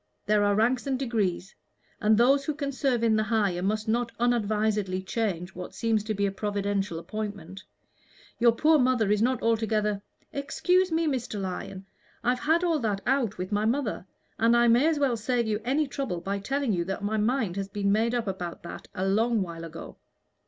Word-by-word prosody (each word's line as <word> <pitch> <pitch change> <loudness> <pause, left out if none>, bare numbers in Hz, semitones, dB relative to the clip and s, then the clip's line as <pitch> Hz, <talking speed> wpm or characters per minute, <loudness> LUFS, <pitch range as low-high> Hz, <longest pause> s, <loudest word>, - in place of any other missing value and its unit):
There 210 0 +3
are 205 0 +3
ranks 240 +5 +1
and 265 -1 0
degrees 210 -8 -1 0.5
and 215 0 +3
those 270 +4 +4
who 305 - -2
can 285 -2 -3
serve 260 -3 0
in 225 -1 +4
the - - +2
higher 210 -5 0
must 215 +3 -1
not 230 +1 0
unadvisedly 215 -5 0
change 190 -4 -2
what 180 0 -8
seems 225 -2 +1
to 215 -1 -2
be 200 0 +1
a 195 - 0
providential 200 -2 -2
appointment. 200 -1 -6 0.8
Your 235 0 +6
poor 305 +6 +4
mother 250 -5 +2
is 210 0 +2
not 250 +1 +1
altogether 215 -2 +1 0.2
" - - -39
"Excuse 360 +5 +1
me, 325 +1 +1
Mr. 250 -7 -2
Lyon; 190 0 -5 0.4
I've 245 +1 +1
had 320 +5 +2
all 335 -3 +2
that 210 -5 -1
out 245 -5 +1
with 185 +2 -5
my 205 +1 +1
mother, 230 -5 -1 0.3
and 230 +1 +4
I 240 0 +4
may 240 +6 +5
as 325 -2 +2
well 275 -4 +2
save 235 +2 0
you 215 0 -1
any 275 +6 +1
trouble 270 -10 -3
by 195 +3 -3
telling 270 +2 -1
you 175 -2 0
that 195 +2 -4
my 215 +2 0
mind 215 -3 0
has 195 -1 -2
been 200 0 -1
made 225 +3 +2
up 235 -2 -1
about 180 -4 -5
that 170 - -8
a 190 +1 -1
long 220 +2 +2
while 165 -2 -7
ago. 165 0 -9
220 Hz, 200 wpm, -27 LUFS, 200-245 Hz, 0.8 s, Your